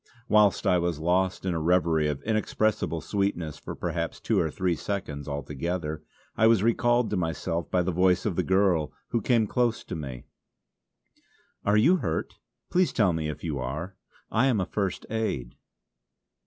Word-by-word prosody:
Whilst 105 -2 +4
I 90 - +4
was 85 -2 -1
lost 90 +4 0
in 90 - 0
a 80 - -1
reverie 80 -2 +2
of 75 -2 -3
inexpressible 110 -6 0
sweetness 85 -3 -2
for - - -7
perhaps - - -3
two - - +1
or 80 - +1
three 90 +2 0
seconds 75 -7 -4
altogether, 75 +3 -3 0.3
I 110 - +4
was 115 -3 +4
recalled 120 +1 +2
to 105 - 0
myself 85 0 -2
by 90 -1 +2
the 95 - -1
voice 90 +1 +2
of 105 -5 0
the - - +2
girl 95 -5 +2 0.2
who 115 - 0
came 115 0 +3
close 120 +1 0
to - - -6
me: 65 -6 -6 1.4
"Are 105 +1 +3
you 160 +13 +5
hurt? 80 - -2 0.4
Please 180 -1 +3
tell 100 -7 +2
me 80 -1 -2
if 75 - -7
you 75 -5 -2
are. 75 +9 -4 0.4
I 120 +5 +3
am 120 -6 +2
a 95 - 0
First 95 -2 -2
Aid." 70 - -2
90 Hz, 170 wpm, -27 LUFS, 80-105 Hz, 1.4 s, you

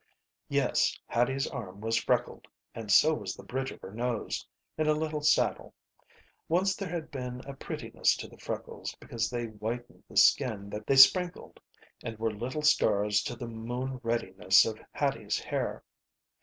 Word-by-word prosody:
Yes, - - +2
Hattie's 135 +4 +1
arm 100 -8 -6
was 115 +1 -1
freckled, - - 0 0.3
and 110 -3 -5
so 155 +10 +6
was - - -4
the - - -12
bridge 130 +1 -3
of - - -10
her 95 - -9
nose, 120 0 -2 0.3
in 155 0 0
a 155 - +4
little 155 -1 -2
saddle. 150 - +2 0.7
Once 190 +4 +2
there 195 -3 -5
had 165 -2 -5
been 125 -2 -5
a 140 - -8
prettiness 135 - -1
to - - -6
the - - -17
freckles - - -5
because 115 -1 -3
they 120 -1 -2
whitened 110 +2 -6
the - - -6
skin 100 -4 +4 0.2
they 135 - +3
sprinkled 180 +6 +5 0.4
and 115 -1 -5
were 110 0 -1
little 130 +8 -4
stars 105 -8 +3
to 120 - -4
the 120 +1 -6
moon 120 +3 -4
reddiness 100 -5 +3
of 110 -1 -4
Hattie's - - -1
hair. - - -3
120 Hz, 160 wpm, -30 LUFS, 110-140 Hz, 0.7 s, so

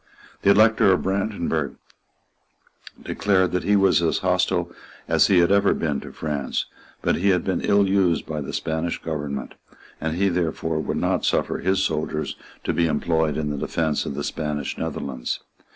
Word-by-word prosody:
The - - +3
Elector 110 -1 +5
of 90 - +2
Brandenburg 95 -6 -1 1.3
declared 95 -3 +1
that 90 - -1
he 105 - +4
was 95 -3 +4
as 85 - +1
hostile - - +1 0.4
as - - +4
he 95 - +4
had 85 +1 +4
ever 100 0 +4
been 75 -4 -1
to - - -9
France; 75 -4 -2 0.4
but - - +2
he 100 +4 +2
had 90 -2 +2
been 95 - -1
ill 100 -1 +3
used 95 -3 +2
by 75 -1 -4
the 70 - -5
Spanish 80 +1 -2
government; 75 -4 -4 0.5
and 80 0 -1
he 100 +1 +2
therefore 80 -2 -1
would 75 - -2
not - - 0
suffer - - 0
his 95 +1 +1
soldiers 75 -3 -2 0.3
to - - -1
be 85 - +2
employed 80 -2 0
in 75 -1 -1
the 75 - -3
defence 80 -1 -1
of - - -4
the - - -3
Spanish 75 -3 -3
Netherlands. 65 -3 -4
85 Hz, 170 wpm, -23 LUFS, 75-95 Hz, 1.3 s, Elector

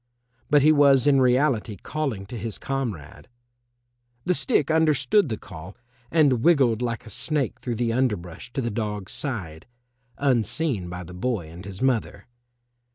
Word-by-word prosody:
But 145 -3 +5
he 155 - +6
was 140 -4 +5
in 140 -2 +4
reality 125 -4 +2
calling 135 - -4
to 120 +5 -9
his 115 -2 -5
comrade. 120 - -5 1.0
The 180 - +2
stick 140 0 +2
understood 155 +2 +3
the 110 - -2
call 90 +1 -11 0.3
and 145 -7 +3
wiggled 130 -8 +3
like 120 -2 -3
a - - -10
snake 145 - -2
through 120 -2 -3
the 115 0 0
underbrush 105 -6 -2
to 135 - -1
the 120 -2 -2
dog's 105 -3 -4
side, 90 - -5 0.5
unseen 125 - 0
by 90 +1 -6
the 90 +1 -11
boy 90 -4 -3
and 85 +3 -10
his 100 +2 -7
mother. 115 -6 0
120 Hz, 155 wpm, -24 LUFS, 100-140 Hz, 1.0 s, he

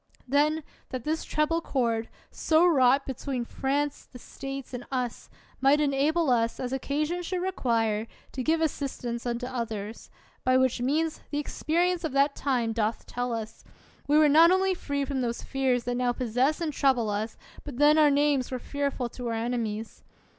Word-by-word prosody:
Then, 300 +4 +2 0.3
that 255 -2 -5
this 315 +1 -1
treble 310 +2 0
cord, 230 -6 -1 0.2
so 320 +2 +3
wrought 275 -4 +4
be 265 - -3
tween 255 -1 -4
France, 285 +4 -2
the 250 - -10
States, 270 +1 -7
and 245 - -5
us, 250 -3 -3 0.3
might 275 +3 +4
enable 295 +2 +2
us, 230 -1 +1
as 255 0 -3
occasion 300 +6 -1
should 360 +1 -3
require, 230 - 0 0.2
to 260 - -4
give 320 +5 +1
assistance 255 -6 -2
unto 240 +1 -2
others; 225 -4 -5 0.3
by 255 0 +4
which 260 -2 +2
means, 310 +5 0
the 290 - -3
experience 340 +4 0
of 320 - -2
that 280 +1 +3
time 245 -5 0
doth 220 0 -1
tell 245 0 -3
us, 225 -1 -5 0.4
we 295 +1 +4
were 305 -1 +6
not 320 +4 +7
only 375 +1 +3
free 285 -5 -2
from 270 -2 -2
those 235 -1 -2
fears 260 -3 0
that 245 - -2
now 245 0 +1
possess 255 +6 0
and 315 -3 -1
trouble 250 -7 +2
us, 215 +2 -3 0.3
but 285 -5 -8
then 295 +2 +5
our 300 -1 +6
names 285 -2 +2
were 255 - -3
fearful 280 -1 -2
to 245 +1 -6
our 230 - -1
enemies. 225 -2 -3
270 Hz, 175 wpm, -27 LUFS, 240-300 Hz, 0.4 s, not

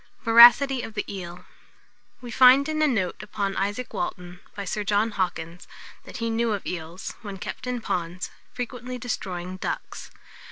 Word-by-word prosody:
VORACITY 240 +3 +8
OF 225 - -8
THE 205 - -2
EEL. 175 -2 -8 0.8
We 245 -1 -8
find 260 +4 +6
in 310 0 -1
a 305 - +5
note 195 -11 -1
upon 200 -2 -3
Isaac 205 +6 -3
Walton, 180 0 -5 0.2
by 200 - -5
Sir 210 +2 -2
John 210 +2 +1
Hawkins, 175 -3 -3 0.4
that - - -9
he 230 -1 -2
knew 230 0 0
of 200 - -4
eels, 170 +1 -6
when 200 -3 -7
kept 220 - -7
in 250 -1 -2
ponds, 175 -3 -3 0.2
frequently 250 0 -6
destroying 185 -7 -5
ducks. - - -5
210 Hz, 160 wpm, -25 LUFS, 180-245 Hz, 0.8 s, VORACITY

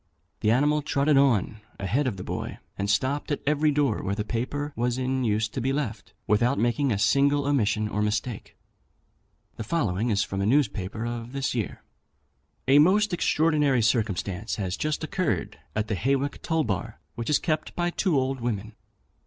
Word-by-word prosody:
The 105 - +1
animal 145 +6 +3
trotted 145 +1 +2
on 115 -6 +2 0.2
a 100 - -4
head 130 +9 +1
of 105 -6 -2
the 90 - -6
boy, - - -4 0.2
and 100 0 -2
stopped 130 +8 0
at 145 - -2
every 150 +1 +2
door 140 -6 +1
where 100 - -2
the 105 - -2
paper 145 +6 -3
was 120 +1 0
in 130 0 -1
use 110 -1 +1
to 130 - -4
be 130 +3 0
left, 115 - -4
without 120 +6 +2
making 120 +3 +1
a 105 - +1
single 140 +6 +3
omission 110 -6 +1
or 105 0 -2
mistake. 105 +2 -2 1.0
The - - -4
following 110 - 0
is 100 -2 +2
from 95 0 -3
a - - +1
newspaper 110 -5 0
of 120 +1 -5
this 135 -1 -1
year: 115 -6 -3 0.8
"A 140 +2 +6
most 200 +5 +4
extraordinary 150 -7 +2
circumstance 105 -3 0
has 95 -3 -2
just 155 +5 -2
occurred 180 +2 -2 0.2
at 105 +1 0
the 110 - -1
Hawick 135 +6 0
toll 160 -1 0
bar, 100 - -3
which 115 -1 -4
is 150 - +5
kept 155 -3 -2
by 175 0 0
two 175 -4 +1
old 130 0 -2
women. 110 -2 -3
125 Hz, 180 wpm, -26 LUFS, 105-145 Hz, 1.0 s, A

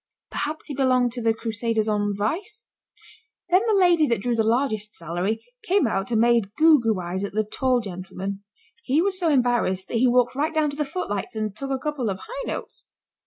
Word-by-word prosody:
Perhaps 305 +2 -3
he 295 - -5
belonged 255 -2 +2
to 240 +1 -5
the 225 0 +3
crusaders 225 0 -1
on 205 -1 0
vice. 375 - -3 0.9
Then 365 +2 +5
the 420 -3 +3
lady 345 -4 +4
that 235 - +1
drew 240 +3 -1
the 225 - +2
largest 220 -3 0
salary 180 +7 -3 0.2
came 380 -4 +2
out 195 -4 -1
and 230 -2 +1
made 230 -3 +2
goo 315 -1 +6
goo 220 -4 +1
eyes 180 +2 -3
at 200 - -4
the 215 +1 +1
tall 250 +3 +1
gentleman. 195 0 -6 0.4
He 270 +6 +2
was 375 +1 +1
so 340 -3 +2
embarrassed 240 -9 +1
that 235 - -1
he 255 +3 +4
walked 245 0 +3
right 305 +4 -1
down 305 -2 +2
to - - -8
the 300 0 -1
footlights 245 - -4
and 215 -2 -3
took 275 +3 -5
a 270 - 0
couple 275 -4 -2
of 190 - -2
high - - -7
notes. - - -6
240 Hz, 210 wpm, -24 LUFS, 210-295 Hz, 0.9 s, goo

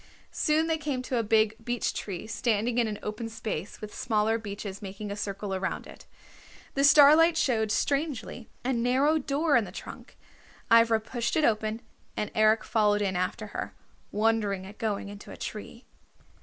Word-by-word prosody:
Soon 310 +1 +2
they 325 -1 0
came 285 -4 -2
to 255 -1 -2
a - - +3
big 220 0 +2
beech 240 0 -1
tree 190 -1 -5
standing 225 +1 0
in 235 - +2
an 210 -1 -4
open 215 +2 -4
space 215 -5 -5
with 215 -1 -8
smaller 225 -1 0
beeches 200 -2 -7
making 200 +1 -6
a - - -3
circle 200 -1 -4
around 190 0 -3
it. - - -14 0.7
The 275 - +1
starlight 300 +3 +7
showed, 220 -7 +1
strangely, 275 - -2 0.2
a 260 - +1
narrow 260 +6 +2
door 290 +2 +1
in 235 - +4
the - - -8
trunk. - - -10 0.5
Ivra 230 -1 +6
pushed 235 +1 -3
it 310 -2 +3
open 220 +1 0 0.3
and 210 - -2
Eric 215 0 +4
followed 210 -2 +2
in 190 -2 -1
after 185 +4 -2
her, - - -5 0.4
wondering 210 -3 +1
at 200 +2 -12
going 210 -3 -2
into 205 0 -10
a - - -9
tree. 230 +3 -7
225 Hz, 170 wpm, -28 LUFS, 210-255 Hz, 0.7 s, starlight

